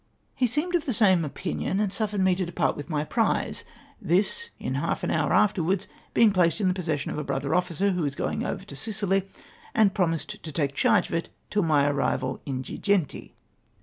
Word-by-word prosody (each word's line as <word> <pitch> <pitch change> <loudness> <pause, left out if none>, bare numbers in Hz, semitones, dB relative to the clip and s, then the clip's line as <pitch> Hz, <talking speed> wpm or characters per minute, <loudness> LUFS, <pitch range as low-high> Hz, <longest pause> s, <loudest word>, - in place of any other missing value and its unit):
He 255 - +1
seemed 300 +9 -1
of 340 -4 +1
the 255 - +1
same 190 -5 +4
opmion, 175 +5 -2
and 205 -2 0
suffered 210 -3 -1
me 190 0 +4
to 185 +1 -1
depart 175 - 0
with 145 +3 -7
my 150 -2 0
prize; - - 0 0.4
tliis 210 - +1
in - - -4
half - - -1
an - - 0
lioirr - - +1
afterwards 195 -1 +2 0.3
being 225 -2 +6
placed 180 -1 +2
in 200 - +2
the 185 - +3
possession 160 -6 -2
of - - -3
a - - -2
brother 140 +1 -2
officer 180 +2 +1
who 180 -1 -1
was 140 -3 -1
going - - -2
over - - -3
to 140 - -9
Sicily, 195 +3 +1 0.5
and 205 -3 +4
pro 190 -5 +2
mised 160 -3 -3
to 155 - -7
take 140 -1 -1
charge 215 - +3
of - - -7
it 165 0 -1 0.2
till 205 - +2
my 150 -5 +3
arrival 140 -2 -1
at - - -2
Girgenti. 195 +1 -1
180 Hz, 210 wpm, -26 LUFS, 155-205 Hz, 0.5 s, being